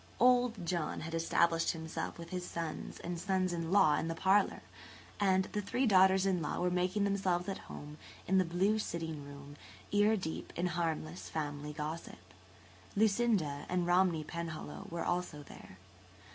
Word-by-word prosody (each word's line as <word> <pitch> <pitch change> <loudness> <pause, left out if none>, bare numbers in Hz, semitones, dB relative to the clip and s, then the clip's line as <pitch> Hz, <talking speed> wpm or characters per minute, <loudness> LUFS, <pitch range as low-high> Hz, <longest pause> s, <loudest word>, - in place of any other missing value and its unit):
"Old" 245 -5 +4
John 170 -2 -2
had 165 +1 -6
established 165 0 +2
himself 160 -1 -5
with 170 +1 -9
his 180 -1 -3
sons 165 -3 -5
and 175 0 -4
sons 185 0 0
in 165 -1 -3
law 190 -7 +5
in 165 - -2
the 165 - -2
parlour, 195 +4 +2 0.6
and 190 -2 +3
the 210 - -1
three 250 +6 0
daughters 190 -2 +5
in 185 -3 +1
law 150 - -2
were 180 0 +1
making 180 +3 +1
themselves 190 -3 +1
at 195 - -3
home 150 +1 -9 0.3
in 190 +1 +3
the - - +4
blue 190 +5 +1
sitting 160 -6 -4
room, 140 0 -11 0.3
ear 210 +2 +4
deep 160 -5 -5
in 175 - -1
harmless 170 -1 -2
family 150 -1 -4
gossip. 155 - -5 0.8
Lucinda 205 -9 +2
and 180 -1 +1
Romney 175 -2 +3
Penhallow 170 +4 -6
were 170 -1 -3
also 175 -4 -2
there. 95 - -13
175 Hz, 160 wpm, -33 LUFS, 160-190 Hz, 0.8 s, law